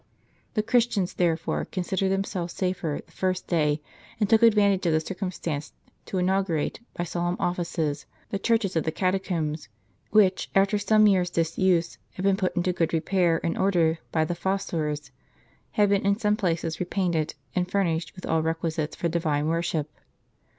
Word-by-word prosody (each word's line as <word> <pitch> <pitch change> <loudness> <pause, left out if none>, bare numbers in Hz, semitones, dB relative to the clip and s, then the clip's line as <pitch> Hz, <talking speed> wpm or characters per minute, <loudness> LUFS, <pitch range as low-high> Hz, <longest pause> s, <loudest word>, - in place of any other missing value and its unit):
The 215 - +2
Christians, 225 -5 +1
there 170 -2 +2
fore, 165 - -2
considered 190 +1 -1
themselves 190 -3 -2
safer 180 -5 -2
the - - -25
first 185 -1 -1
day, 150 -3 +1 0.4
and 210 - +2
took 220 +2 +4
advantage 205 -5 +4
of 165 - +3
the 155 - +4
circumstance 165 -4 -4 0.3
to 190 - -3
inaugurate, 185 -4 0 0.2
by 175 - -2
solemn 175 +1 -2
offices, 165 -4 -2 0.2
the 200 - -1
churches 220 -4 +1
of 160 - +2
the 160 - -1
catacombs, 170 -6 -1 0.4
which, 195 -3 +3
after 195 +2 +3
some 215 +1 +4
years' 185 -4 +3
disuse, 170 +1 +1
had 185 - -6
been 195 -1 +4
put 190 -2 -1
into 180 0 +1
good 165 -2 0
repair 170 0 +2
and 165 - -1
order 170 -4 +2
by 160 -1 +2
the 175 - -2
fos 190 +3 -1
sores, 150 -2 -3 0.6
had 205 -1 +3
been 200 -1 +2
in 200 0 +2
some 210 -2 +2
places 165 -6 -1
repainted, 175 -4 -1 0.2
and 180 -1 0
furnished 175 -4 0
with 185 - -8
all 160 0 +1
requisites 160 -1 -2
for 170 - -1
divine 155 -3 0
worship. 165 -2 -1
180 Hz, 165 wpm, -26 LUFS, 165-195 Hz, 0.6 s, took